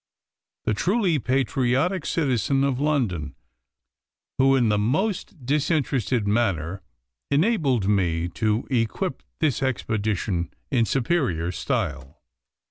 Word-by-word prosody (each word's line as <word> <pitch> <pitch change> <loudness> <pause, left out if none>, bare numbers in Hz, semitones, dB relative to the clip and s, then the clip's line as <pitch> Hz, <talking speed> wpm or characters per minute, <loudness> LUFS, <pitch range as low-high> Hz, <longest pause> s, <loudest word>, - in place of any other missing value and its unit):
the 110 - +2
truly 185 - +1
patriotic 135 +6 +1
citizen 135 -3 +1
of 135 -2 0
London, 105 - 0 1.0
who, 135 +1 +5
in 120 -4 +3
the 105 -1 +2
most 160 - -1
disinterested 135 - 0
manner, 100 -5 0 0.5
enabled 140 - +2
me 85 -5 +1
to 105 +5 -1
equip 125 - -1 0.2
this 150 -5 0
expedition 105 - -1 0.2
in 120 -4 +3
superior 120 - 0
style. 70 -5 -3
125 Hz, 100 wpm, -24 LUFS, 100-145 Hz, 1.0 s, who